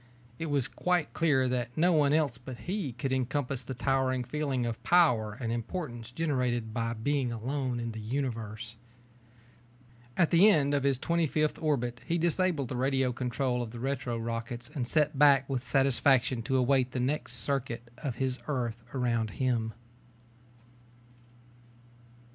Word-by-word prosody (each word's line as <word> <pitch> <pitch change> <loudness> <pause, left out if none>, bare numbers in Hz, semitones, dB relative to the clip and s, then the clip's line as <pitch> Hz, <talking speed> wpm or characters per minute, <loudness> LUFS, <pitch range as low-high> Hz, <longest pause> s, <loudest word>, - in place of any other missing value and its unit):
It 165 - -3
was 140 -4 +1
quite 180 -4 0
clear 145 -6 +2
that 125 0 -2
no 175 +3 +4
one 145 -3 +4
else 145 -6 +1
but 125 -1 -9
he 185 -6 -3
could 130 +3 -2
encompass 130 0 -1
the 130 - -6
towering 130 0 +1
feeling 135 -1 -1
of 115 -1 -4
power 120 -12 +3
and 115 -3 -2
importance 120 -1 -4
generated 125 -6 -1
by 115 0 -1
being 130 +2 -1
alone 125 +2 -2
in 115 0 -3
the 110 - -7
Universe. 115 -2 -4 1.4
At 170 -3 +3
the 180 +5 +7
end 145 -7 +3
of 145 - +2
the 140 0 +2
twenty 170 +5 0
fifth 155 +1 0
orbit 125 -6 -1
he 170 - 0
disabled 170 -5 +1
the - - -3
radio 130 0 +1
control 125 0 -1
of 120 - -4
the 120 +1 -8
retro 130 -2 -2
rockets 115 +2 -5
and 130 -6 -2
sat 150 0 +1
back 140 -2 +6
with 130 -3 -2
satisfaction 135 -1 +3
to 130 +3 0
await 130 0 +2
the 130 - -1
next 130 0 -1
circuit 120 -1 -2
of 135 -6 -3
his 130 -1 -1
Earth 120 -5 -2
around 115 -3 0
Him. 120 -4 0
130 Hz, 155 wpm, -30 LUFS, 120-145 Hz, 1.4 s, the